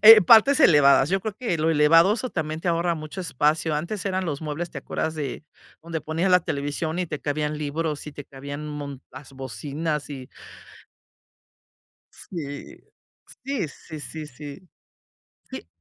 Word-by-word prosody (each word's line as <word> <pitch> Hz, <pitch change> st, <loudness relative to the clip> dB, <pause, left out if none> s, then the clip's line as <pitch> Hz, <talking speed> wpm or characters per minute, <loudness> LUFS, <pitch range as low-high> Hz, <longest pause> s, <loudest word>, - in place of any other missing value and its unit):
eh, 220 Hz, 0 st, +11 dB
partes 230 Hz, -, +7 dB
elevadas. 145 Hz, -, +6 dB
Yo 195 Hz, 0 st, +2 dB
creo 215 Hz, +1 st, -3 dB
que 230 Hz, -9 st, -1 dB
lo 160 Hz, +1 st, +2 dB
elevado, 165 Hz, +5 st, +6 dB
eso 255 Hz, +2 st, -3 dB
también 155 Hz, -4 st, -3 dB
te -, -, -7 dB
ahorra 170 Hz, 0 st, +1 dB
mucho 155 Hz, +5 st, -7 dB
espacio. 155 Hz, 0 st, +1 dB
Antes 175 Hz, +7 st, -4 dB
eran 190 Hz, -1 st, -1 dB
los 145 Hz, -4 st, -3 dB
muebles, 155 Hz, +3 st, -3 dB
¿te -, -, -6 dB
acuerdas 160 Hz, 0 st, -3 dB
de 150 Hz, -1 st, -5 dB, 0.4 s
donde 165 Hz, -1 st, -4 dB
ponían 165 Hz, +5 st, 0 dB
la 180 Hz, -, +7 dB
televisión 155 Hz, +2 st, -3 dB
y 180 Hz, -, 0 dB
te 150 Hz, -2 st, -5 dB
cabían 150 Hz, +1 st, -1 dB
libros, 150 Hz, +1 st, -3 dB
y 150 Hz, -, -9 dB
te 145 Hz, -1 st, -9 dB
cabían 140 Hz, +2 st, -8 dB
un 150 Hz, -, -6 dB
mo 140 Hz, -2 st, -6 dB
las 135 Hz, +1 st, -11 dB
bocinas 145 Hz, +5 st, -4 dB
y 130 Hz, -2 st, -7 dB, 1.9 s
sí, 145 Hz, -6 st, -8 dB, 0.7 s
sí, 265 Hz, -, -2 dB
sí, 155 Hz, +1 st, -10 dB
sí, 155 Hz, +1 st, -6 dB
sí. 150 Hz, +6 st, -11 dB, 0.8 s
Sí, -, -, -7 dB
155 Hz, 165 wpm, -25 LUFS, 145-175 Hz, 1.9 s, eh